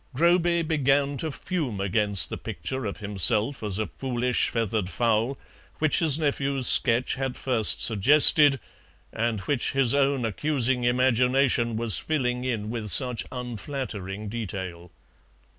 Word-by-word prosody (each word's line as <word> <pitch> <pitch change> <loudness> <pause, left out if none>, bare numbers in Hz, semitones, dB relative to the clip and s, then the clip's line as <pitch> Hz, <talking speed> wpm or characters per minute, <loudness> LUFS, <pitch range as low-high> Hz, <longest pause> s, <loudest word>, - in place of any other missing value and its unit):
Groby 170 +2 +2
began 140 -3 0
to 160 +3 -2
fume 140 - -4
against 100 -2 +1
the - - -4
picture 130 -3 -5
of 100 - -6
himself 105 +5 +1
as 105 -3 -3
a 110 - -1
foolish 125 0 -2
feathered 110 -4 -2
fowl 115 +4 -1 0.4
which 155 -1 +2
his 155 -4 +4
nephew's 140 -3 -2
sketch 120 +1 +3
had 135 -1 -4
first 120 -5 +1
suggested, 140 +5 +6 0.5
and 115 -2 -2
which 125 +5 -1
his 135 -3 +2
own 140 -3 +1
accusing 125 +1 -1
imagination 125 -1 +1
was 115 -3 +1
filling 125 -5 -2
in 110 -4 -3
with 115 -3 -5
such 125 +2 -1
unflattering 115 -5 -6
detail. 95 -5 -6
125 Hz, 130 wpm, -25 LUFS, 110-140 Hz, 0.5 s, suggested